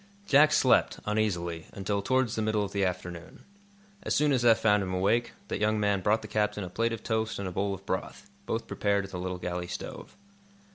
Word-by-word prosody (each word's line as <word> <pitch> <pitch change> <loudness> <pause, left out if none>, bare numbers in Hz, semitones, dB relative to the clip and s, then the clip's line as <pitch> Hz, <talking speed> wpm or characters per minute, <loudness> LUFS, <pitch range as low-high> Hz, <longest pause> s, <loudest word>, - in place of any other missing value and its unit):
Jack 150 -2 +6
slept, 130 -4 +3
uneasily, 90 -6 -1
until 100 +1 -2
towards 130 +1 +1
the 110 - -1
middle 110 -1 +1
of 100 - -5
the 100 -1 0
afternoon. 90 -2 -4 0.6
As - - -1
soon 150 0 +3
as 125 -3 +2
Eph 115 -2 +6
found 105 -2 +3
him 95 -1 -2
awake, 110 +6 +1
that - - -3
young 110 0 +1
man 100 -2 +1
brought 105 +3 +2
the - - -7
captain 105 0 -1
a 90 - -7
plate 115 +4 0
of 115 -1 -5
toast 110 -1 -1
and 100 - -4
a - - -4
bowl 100 +3 -1
of 95 +1 -15
broth, 95 +1 -4 0.2
both 115 - -2
prepared 100 -1 0
at 95 - -11
the 90 - -5
little 90 0 -3
galley 90 0 -4
stove. - - -7
105 Hz, 220 wpm, -29 LUFS, 95-110 Hz, 0.6 s, Jack